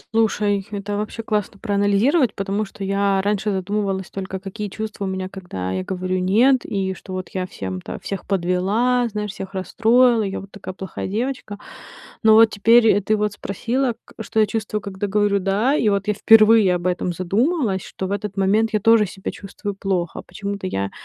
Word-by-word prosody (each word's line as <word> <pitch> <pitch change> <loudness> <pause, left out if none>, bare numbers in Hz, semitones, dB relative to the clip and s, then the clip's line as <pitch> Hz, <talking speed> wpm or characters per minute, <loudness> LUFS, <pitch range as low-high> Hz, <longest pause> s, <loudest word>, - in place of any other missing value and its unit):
Слушай, 210 -3 +2
это 205 0 -4
вообще 215 +2 -4
классно 210 -2 -2
проанализировать. 205 - +2
Потому 195 +2 -2
что 195 0 -9
я 195 0 +1
раньше 210 +1 0
задумывалась 195 -1 -2
только, 190 -1 -5
какие 205 +2 -6
чувства 215 0 -5
у - - -2
меня, 190 0 -3
когда 175 - -6
я 95 0 -2
говорю 185 - -2
нет, 225 +9 +4
и 195 -2 -2
вот 190 - -5
что 185 -1 -5 0.2
я 185 - -2
всем-то 95 - -6
всех 195 - -6
подвела, 200 +7 +1
знаешь, 210 -1 -4
всех 195 0 -8
расстроила, 230 +5 +3
я 195 -2 -3
вот 195 0 -12
такая 185 -1 -8
плохая 190 -1 -6
девочка. 225 0 -3 0.6
Но 220 -1 +6
вот 225 0 +7
теперь 225 +3 +5
и 205 - +4
ты 215 +2 +1
вот 210 -1 0
спросила, 235 +5 -2
к - - -18
что 220 +1 -2
я 215 - +6
чувствую, 210 0 -3
когда 200 0 -4
говорю 205 0 +2
да. 200 +8 +1
И 230 -7 +2
вот 200 -1 0
я 210 - +2
впервые 215 -2 +6
об 175 0 -5
этом 180 0 0
задумалась, 200 - 0
что 190 - -6
в 190 - -4
этот 200 0 -4
момент 210 +3 +2
я 215 - +2
тоже 225 0 +4
себя 190 +1 -6
чувствую 200 +1 -6
плохо. 190 -3 -2
Почему-то 200 -2 -5
я 100 - -2
200 Hz, 190 wpm, -21 LUFS, 190-215 Hz, 0.6 s, вот